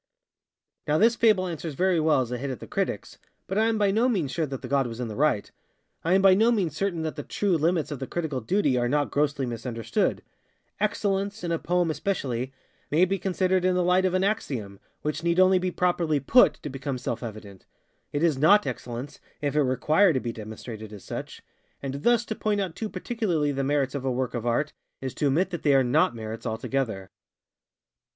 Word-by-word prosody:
Now 150 +1 +3
this 230 +6 +4
fable 215 -5 +3
answers 165 -3 -5
very 185 +1 +2
well 155 -3 +3
as 125 -1 -4
a 125 - -3
hit 140 +2 -3
at 130 -5 -5
the - - -8
criticsŌĆöbut - - -3 0.4
I 220 - +4
am 225 -1 +1
by 205 -2 +3
no 230 +5 +2
means 175 - 0
sure 160 -2 -1
that 135 -1 -6
the - - -4
god 135 0 +1
was 115 0 -7
in 120 -2 -3
the 105 - -6
right. 140 -6 +1 0.5
I 170 +3 +3
am 195 - +3
by 195 -1 +8
no 220 +5 +4
means 185 -10 0
certain 175 -2 -1
that 155 - -3
the - - -3
true 195 +5 0
limits 165 0 +1
of 145 - -4
the 135 - -5
critical 155 -7 -3
duty 145 - +1
are 120 0 0
not 145 +1 +1
grossly 145 -2 0
misunderstood. 115 -1 -2 0.6
Excellence, 200 -1 -1
in 170 - -2
a 165 - 0
poem 175 -1 +1
especially, 135 - -2 0.4
may 165 +5 +4
be 195 +1 -1
considered 185 0 +1
in 185 0 +2
the 180 - +2
light 180 +1 +3
of 185 -1 +1
an 185 - +2
axiom, 125 - -2 0.2
which 155 +2 -2
need 170 +1 +2
only 185 0 +6
be 185 0 -1
properly 175 -4 +1
_put, 235 - +5
_to 150 - -6
become 135 0 -4
self 120 -2 -4
evident. 105 -4 -9 0.4
It 145 +2 -1
is 155 -6 +2
_not 205 +8 +6
_excellence 125 +4 -6 0.2
if 145 -1 -2
it 150 - +4
require 155 +8 +3
to 130 - +1
be 120 -2 -4
demonstrated 110 0 -8
as 105 -3 -10
such:ŌĆöand 140 0 -8
thus 240 +3 +3
to 220 - -3
point 210 -1 -1
out 185 -5 -3
too 220 - -4
particularly 180 -14 -1
the 135 0 -2
merits 140 -1 0
of 140 -2 -4
a 135 - 0
work 125 0 -2
of 120 -1 -3
Art, 130 +6 0 0.3
is 130 -1 -5
to 145 - 0
admit 170 +8 +1
that 175 - -4
they 145 -2 +4
are 135 - +5
_not 120 -1 +3
_merits 110 0 -6
altogether. 110 -4 -3
150 Hz, 215 wpm, -26 LUFS, 130-185 Hz, 0.6 s, by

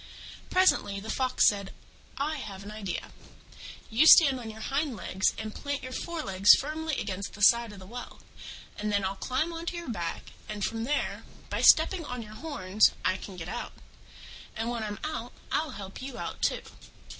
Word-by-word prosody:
Presently 365 - +3
the 220 +2 -5
Fox 255 -1 +3
said, 200 -2 0 0.4
"I 305 +3 -1
have 200 -7 -7
an 205 - -8
idea. 210 -4 -5 0.8
You 255 +8 +5
stand 275 -7 +8
on 230 -2 -7
your 220 0 -9
hind 275 +3 -1
legs, 190 -1 0
and 215 -1 -5
plant 285 -1 -4
your 255 - -6
forelegs 205 - +4
firmly 310 +1 -3
against 200 -1 -4
the 205 - -10
side 235 +1 +6
of 205 - -11
the 190 - -11
well, 245 +5 -9 0.6
and 210 0 -1
then 200 -1 +1
I'll 190 +1 -2
climb 265 - -1
on 335 +1 -6
to 350 - -2
your 340 -7 -5
back, 170 -6 -4 0.2
and, 210 -2 -2
from 225 0 -3
there, 295 +3 -1 0.3
by - - -1
stepping 330 +2 +6
on 250 -5 -5
your 215 0 -11
horns, 215 - +2
I 185 - +3
can 190 0 -8
get 165 -1 -6
out. 240 +6 -5 0.8
And 225 +1 -2
when 235 -2 -3
I'm 205 -1 -4
out, 305 -6 -4 0.2
I'll 310 0 0
help 195 +2 -8
you 265 -1 -7
out - - -6
too." - - +1
225 Hz, 190 wpm, -29 LUFS, 200-285 Hz, 0.8 s, stand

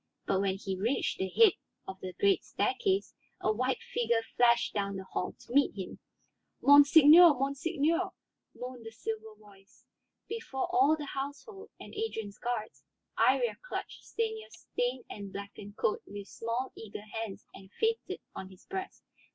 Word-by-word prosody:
But 190 0 +1
when 195 -1 0
he 195 -1 -4
reached 225 +8 -1
the 190 - -1
head 440 - +6 0.4
of 190 0 -7
the 185 -1 -6
great 400 -1 +3
staircase 390 -1 0 0.3
a 215 - +1
white 255 +4 -1
figure 235 -1 +1
flashed 235 -1 +4
down 200 -1 -1
the 190 - -5
hall 190 - -3
to - - -13
meet 280 -4 +4
him. 190 -2 -6 0.6
"Monseigneur, 295 +3 +8
monseigneur," 290 +5 0 0.5
moaned 250 -1 -7
the - - -4
silver 220 -1 -6
voice. 200 -2 -20 0.4
Before 440 -12 -3
all 315 -5 +5
the 300 - -5
household, 285 - -6
and - - -11
Adrian's 225 - -4
guards, 240 -3 -4 0.3
Iría 485 -1 +3
clutched - - -6
Stanief's 445 -1 -4
stained 245 +1 -1
and 200 -2 -8
blackened 200 +1 -9
coat 210 - 0
with 200 0 -8
small, 235 +3 -3
eager 210 -2 -8 0.2
hands 215 -4 -7
and 190 - -13
fainted 450 0 0
on 190 - -7
his 185 -1 -17
breast. 380 0 -6
245 Hz, 150 wpm, -31 LUFS, 205-315 Hz, 0.6 s, Monseigneur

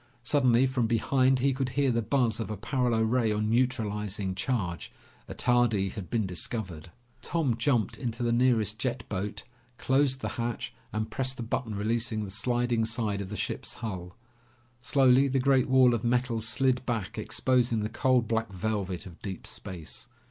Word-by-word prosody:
Suddenly 130 -1 +4
from 130 -3 0
behind 130 +3 +3
he 135 +2 +2
could 130 -1 -1
hear 140 -2 +3
the 115 0 +1
buzz 120 -1 +1
of 115 - -3
a 105 - -4
paralo 120 +1 +1
ray 115 0 +2
on 105 +1 0
neutralizing 105 -5 0
charge. 95 -4 -2 0.4
Attardi 120 -6 +2
had 100 -5 -7
been 115 -3 0
discovered. 90 -2 -4 0.3
Tom 155 -8 0
jumped 115 -3 0
into 120 -2 -3
the 120 - +1
nearest 115 -3 +2
jet 125 0 -2
boat, 100 +1 -3 0.3
closed 130 0 +2
the - - -2
hatch, 120 -1 -3 0.2
and 110 +1 -3
pressed 130 0 -1
the 120 - -4
button 115 -1 -2
releasing 110 +1 -1
the 100 - -6
sliding 120 +2 0
side 110 -3 -1
of 95 - -6
the 105 - -5
ship's - - -3
hull. 90 -5 -6 0.7
Slowly, 135 0 +4
the 135 0 0
great 135 0 +3
wall 130 -2 +6
of 115 - -1
metal 120 -1 +1
slid 125 +3 +1
back 115 -6 -2
exposing 120 -3 +1
the 105 - -1
cold 125 0 +2
black 115 -2 -1
velvet 95 -1 -2
of 85 -3 -12
deep 95 -3 -6
space. 85 -5 -7
115 Hz, 170 wpm, -28 LUFS, 105-130 Hz, 0.7 s, wall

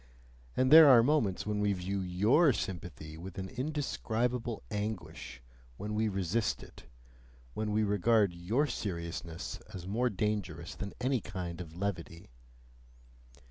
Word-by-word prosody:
and 130 +1 +3
there 160 -1 +11
are 120 -3 +8
moments 120 -9 +1
when 105 0 -1
we 105 -1 +2
view 95 +1 -3
YOUR 105 - +4
sympathy 85 -6 -6
with 95 +2 -9
an 95 0 -4
indescribable 125 - -2
anguish, 85 - -5 0.3
when 105 +1 -4
we 110 +1 +1
resist 100 +2 -1
it, - - -14 0.7
when 110 -1 -2
we 110 +1 +2
regard 105 -1 +3
your 100 +12 0
seriousness 85 - -5 0.2
as 90 -2 -7
more 115 +6 +1
dangerous 105 -6 -2
than 100 - -6
any 130 0 +2
kind 90 -4 -5
of 80 -2 -9
levity. 85 -6 -4
100 Hz, 135 wpm, -32 LUFS, 90-115 Hz, 0.7 s, there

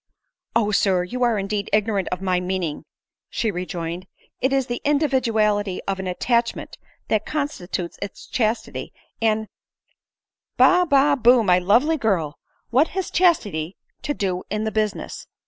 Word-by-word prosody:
" - - -51
O 215 -2 +2
Sir! 190 -3 +2
you 250 +8 -5
are 240 -3 +3
indeed 200 +1 -2
ignorant 210 -2 +1
of 180 +1 -3
my 185 -1 +1
meaning," 180 -4 -3 0.4
she 225 -2 -1
rejoined; 175 -1 -5 0.2
" - - -37
it 260 +2 +2
.is 270 -1 +2
the 240 -1 -4
individuality 225 -9 +1
of 195 -1 -1
an 190 - -4
attachment 235 +6 -1 0.3
that 215 -1 +2
constitutes 190 - -4
its 200 - -7
chastity; 225 -1 -2 0.3
and 220 -1 +1 0.3
" - - -48
" - - -62
Ba 360 0 +5
ba 280 +1 +5
bu, 245 -2 +5
my 180 -3 +4
lovely 240 - +3
girl! 185 - -1 0.3
what 270 +7 +4
has 380 - -2
chastity 200 - +1 0.2
to 290 - -2
do 185 -2 -1
in 210 +1 -2
the 220 - -1
business 215 -1 -3
215 Hz, 160 wpm, -22 LUFS, 185-250 Hz, 0.4 s, Ba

